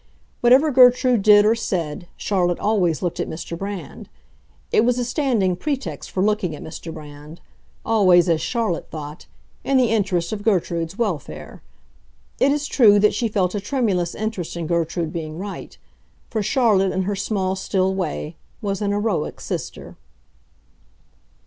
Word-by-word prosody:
Whatever 260 +6 +5
Gertrude 250 -2 +5
did 205 0 +6
or 215 - +5
said, 175 -7 -3
Charlotte 175 -3 0
always 185 -8 +1
looked 175 - -2
at - - -2
Mr. 165 +1 -6
Brand. 195 +1 -7 0.6
It - - +4
was 245 +1 +2
a 245 - -1
standing 235 - 0
pretext 280 - -4
for 185 - -1
looking 210 -6 0
at - - -10
Mr. 165 +1 -8
Brand—always, 170 +6 -1
as 165 -2 +2
Charlotte 215 0 -2
thought, 150 0 -8 0.4
in 275 - +2
the 245 -4 +3
interest 195 -6 0
of 210 - -4
Gertrude's 175 -4 0
welfare. 145 - -4 0.8
It 275 - +4
is 295 0 -1
true 220 -8 +5
that 210 +1 +4
she 235 - 0
felt 190 -4 0
a 205 - -1
tremulous 200 -7 -1
interest 185 -6 -4
in 170 - -3
Gertrude 165 0 -1
being 155 -2 -5
right; 195 0 -7 0.5
for 220 - -1
Charlotte, 210 -4 +2
in 190 - 0
her 200 +2 -2
small, 190 -1 -1
still 190 0 0
way, 170 -3 -4 0.2
was 200 -1 -3
an 205 - 0
heroic 205 -5 -1
sister. - - -6
195 Hz, 150 wpm, -21 LUFS, 170-220 Hz, 0.8 s, did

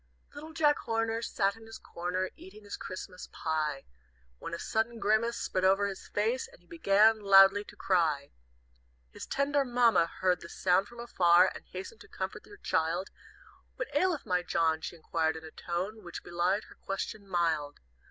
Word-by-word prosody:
"Little 310 +2 -9
Jack 300 -2 +3
Horner 225 0 -1
Sat 200 -3 0
in 225 0 -14
his 225 - -9
corner, 180 +2 -3
Eating 205 +3 -13
his 205 - -6
Christmas 185 0 -8
pie, 155 -3 -2 0.5
When - - -6
a - - -5
sudden 225 +5 -1
grimace 225 +2 +1
Spread 185 - -2
over 195 +2 +4
his 195 -1 -5
face, 225 +5 0
And - - -19
he 175 - -28
began 200 +6 +4
loudly 195 0 +7
to 210 - -13
cry. 160 -8 +1 0.8
"His - - -9
tender 280 +1 +1
Mamma 240 -8 +3
Heard 180 0 0
the 170 - -10
sound 185 +3 +2
from 240 +2 -13
afar, 180 -6 +4
And - - -11
hastened 190 - -8
to - - -13
comfort - - -6
her 410 - -13
child; 170 - -1 0.6
'What - - -5
aileth 365 -5 +1
my 180 -1 +1
John?' 160 -2 +1
She - - -6
inquired 160 -1 -1
in 160 - -8
a 160 - -10
tone 185 +7 -4
Which 175 -1 -8
belied 175 +4 0
her - - -16
question 200 +1 -4
mild. 165 -5 0
195 Hz, 175 wpm, -30 LUFS, 170-225 Hz, 0.8 s, loudly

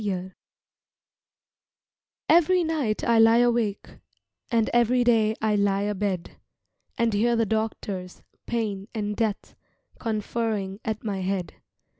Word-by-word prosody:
DOCTORS 185 -2 -3 2.0
EVERY 350 +2 +4
night 300 -10 -1
I 230 -1 +3
lie 225 +1 +6
awake 235 -4 +1 0.6
And 230 -3 +2
every 240 +1 +3
day 220 -2 +3
I 215 -1 +2
lie 200 -1 +1
abed 200 -3 -3 0.6
And 235 -3 +1
hear 235 +4 +2
the 230 -1 +2
doctors, 205 -4 -3 0.2
Pain 210 -4 -2
and 210 -1 -2
Death, 220 -2 -2 0.5
Conferring 215 -3 -2
at 220 -1 -3
my 200 -3 -3
head. 185 -1 -2
220 Hz, 115 wpm, -25 LUFS, 200-235 Hz, 2.0 s, lie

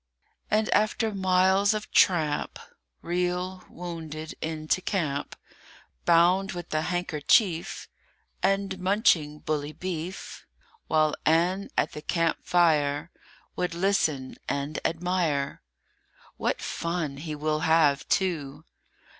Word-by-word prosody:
AND, 215 0 +2
after 215 +1 +2
miles 190 +2 +3
of 215 - -5
tramp, 155 -6 +2 0.5
Reel, 180 +1 -2
wounded, 160 -3 -7
into 160 +2 -1
camp, 155 -8 -2 0.7
Bound 175 +3 +4
with 175 -2 -7
a 155 - +1
handkerchief, 175 - +1 0.5
And 195 -1 0
munching 185 -6 +2
bully 150 -1 -2
beef; 180 +1 -6 0.4
While 155 -1 +3
Ann 175 +5 +2
at - - +2
the 150 - -7
camp 165 +1 0
fire 155 -3 +2 0.4
Would 180 -2 -2
listen 165 -8 0
and 140 +2 -2
admire. 165 -5 -1 0.7
WHAT - - -2
fun 165 -4 -3
he 155 +1 -5
will 155 +1 -1
have, 160 -3 +3
too! 155 -6 -1
170 Hz, 105 wpm, -27 LUFS, 155-185 Hz, 0.7 s, Bound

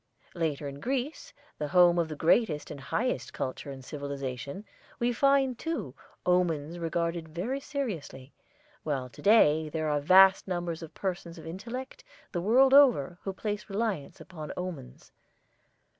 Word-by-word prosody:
Later, 155 -4 -2
in 140 0 -7
Greece, 275 - -3 0.3
the 150 - -2
home 175 +1 +5
of 170 - +1
the 155 - -5
greatest 160 0 +2
and 145 - -7
highest 220 - -2
culture 130 +2 -4
and 135 -2 -9
civilization, 140 - -5 0.3
we 240 +1 +1
find, 270 -1 +3
too, 325 0 -3 0.3
omens 175 -3 +1
regarded 170 0 -2
very 200 - -3
seriously, 195 - -5 0.5
while 135 -4 -3
to - - -14
day 160 -8 +5
there 155 0 -2
are 150 0 +1
vast 190 +5 +6
numbers 175 -2 -3
of 165 - -10
persons 175 -3 -4
of - - -11
intellect, 250 - -7 0.3
the 175 - -2
world 260 +7 +5
over, 230 - +5
who 195 - -2
place 205 +1 -4
reliance 200 -7 -2
upon 155 -5 -8
omens. 180 - -7
175 Hz, 145 wpm, -29 LUFS, 150-225 Hz, 0.5 s, vast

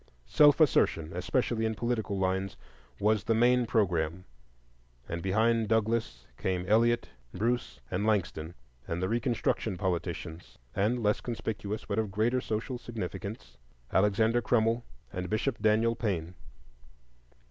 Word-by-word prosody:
Self 145 - +5
assertion, 85 - +3
especially 115 +5 0
in 110 0 0
political 110 -4 -1
lines, 95 0 -1 0.4
was 105 0 +2
the 115 - +2
main 120 +1 +4
programme, 90 -5 0 0.8
and 85 +1 -4
behind 110 +4 +2
Douglass 110 - 0
came 90 -1 -1
Elliot, 120 +3 +3 0.3
Bruce, 115 - -1
and 95 +3 -1
Langston, 90 -6 -1 0.3
and 85 - -2
the 95 - 0
Reconstruction 115 -3 0
politicians, 85 -2 -4 0.2
and, 110 +5 +1
less 105 0 +2
conspicuous 110 -3 -4
but 100 +1 -1
of 110 -2 -1
greater 115 +6 +1
social 115 +3 -3
significance, 100 - -6 0.4
Alexander 110 +4 +3
Crummell 115 +1 +2 0.3
and 90 0 -4
Bishop 110 +3 -1
Daniel 110 +2 +3
Payne. 90 -7 -2
110 Hz, 125 wpm, -30 LUFS, 95-115 Hz, 0.8 s, Self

